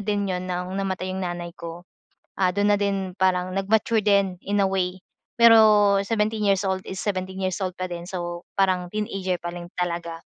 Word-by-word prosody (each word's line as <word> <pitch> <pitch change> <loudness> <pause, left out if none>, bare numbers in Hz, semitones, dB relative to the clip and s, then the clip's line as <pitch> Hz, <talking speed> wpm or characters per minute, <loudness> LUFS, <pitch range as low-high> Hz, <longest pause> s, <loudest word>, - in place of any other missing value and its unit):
din 205 -1 -1
yun 185 -1 -3
ng 180 +1 -3
namatay 190 -1 -2
yung 190 - -4
nanay 175 -1 -4
ko, 170 +1 -9 0.5
ah, 185 -1 +2
dun 205 +2 +2
na - - +5
din 195 -2 -1
parang 185 -1 +1
nag-mature 215 +3 +1
din, 200 -3 +2
in 205 +1 -1
a 200 - +4
way, 185 -1 -1 0.4
pero 215 -3 +6
17 215 +1 -1
years 200 -1 +2
old 190 0 0
is 190 - -7
17 190 -1 -3
years 185 +1 -2
old 185 -1 -3
pa 185 - -2
din. 175 0 -7
So, 175 -2 -4 0.2
parang 185 -2 +2
teenager 195 -3 -2
pa 175 0 -6
rin 175 0 -8
talaga. 170 -2 -3
190 Hz, 190 wpm, -24 LUFS, 180-200 Hz, 0.5 s, pero